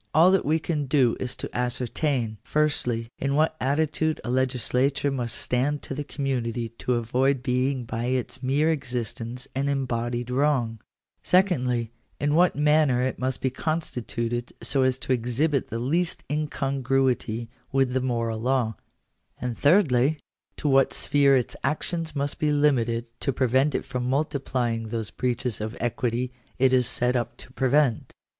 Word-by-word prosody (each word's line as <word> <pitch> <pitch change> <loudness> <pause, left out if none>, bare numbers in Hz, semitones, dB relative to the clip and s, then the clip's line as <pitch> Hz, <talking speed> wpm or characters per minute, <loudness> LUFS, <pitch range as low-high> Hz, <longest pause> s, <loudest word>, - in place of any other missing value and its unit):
All 170 +4 +7
that 190 - +3
we 155 +3 +3
can 155 -3 -2
do 130 -4 +3
is 125 0 -3
to - - -7
ascertain, 125 -1 -1
firstly, 125 -6 0
in 140 +1 0
what 155 +1 +2
attitude 155 +3 0
a 120 - -3
legislature 130 +2 +1
must 120 -4 -1
stand 140 +4 0
to - - -5
the 145 +2 -3
community 125 -5 -2
to 125 - 0
avoid 125 +3 +1
being 130 0 0
by 115 +1 -3
its 125 -1 -2
mere 140 +5 +2
existence 125 -3 -4
an 135 +2 -1
embodied 120 -3 -2
wrong; 125 -5 +1 0.2
— - - -63
secondly, 125 - +2 0.3
in 145 +1 +1
what 175 +3 +4
manner 150 -4 +3
it 130 - -2
must 130 0 -1
be 130 - 0
constituted 120 -6 -3
so 130 +4 0
as 130 -1 +2
to 130 0 -1
exhibit 130 +4 0
the 115 - -4
least 165 +9 -1
incongruity 135 -5 0 0.2
with 135 -2 +2
the 130 - +1
moral 115 -3 -1
law; 125 -1 +1 0.3
— - - -47
and 125 -1 -3
thirdly, 145 - +3 0.4
to 150 - -2
what 135 -1 +4
sphere 140 -1 +4
its 125 -3 0
actions 160 0 -1
must 140 0 -1
be 150 -1 +2
limited 120 -6 +2
to 135 - 0
prevent 130 +3 +2
it - - -2
from 125 -2 -3
multiplying 130 -5 -1
those 110 -1 -4
breaches 125 -3 -1
of 110 +2 -4
equity 120 +1 -1 0.2
it 130 0 +3
is 125 -2 +4
set 125 +1 +1
up 120 -1 -2
to 130 - -12
prevent. 135 -2 +1
130 Hz, 160 wpm, -25 LUFS, 120-145 Hz, 0.4 s, All